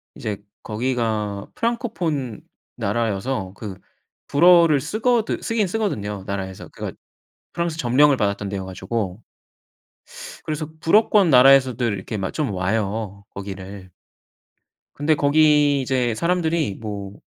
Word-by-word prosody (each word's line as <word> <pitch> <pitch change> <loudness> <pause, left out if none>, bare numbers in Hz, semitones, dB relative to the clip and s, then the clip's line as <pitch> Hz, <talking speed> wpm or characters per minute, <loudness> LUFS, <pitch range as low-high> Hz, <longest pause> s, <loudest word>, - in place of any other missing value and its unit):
이제 105 -2 -4 0.3
거기가 110 -3 -2
프랑코폰 175 - -2 0.4
나라여서 105 -1 -2
그 105 -3 -7 0.5
불어를 170 -1 +6
쓰거든 225 - 0
쓰긴 225 -3 0
쓰거든요 105 - -2
나라에서. 95 -1 -5
그러니까 - - -7 0.6
프랑스 170 -2 -2
점령을 140 +2 +4
받았던 100 -2 -1
데여가지고. 95 +1 -4 1.3
그래서 155 0 -3
불어권 205 +2 +4
나라에서들 130 -3 +5
이렇게 100 +3 -5
막 95 -1 -3
좀 145 -7 -1
와요 100 +1 -2
거기를. 95 -1 -8 1.0
근데 155 +2 +2
거기 145 -1 +4
이제 125 -2 0
사람들이 170 - 0
뭐 100 -3 -6
120 Hz, 280 characters per minute, -22 LUFS, 100-155 Hz, 1.3 s, 불어를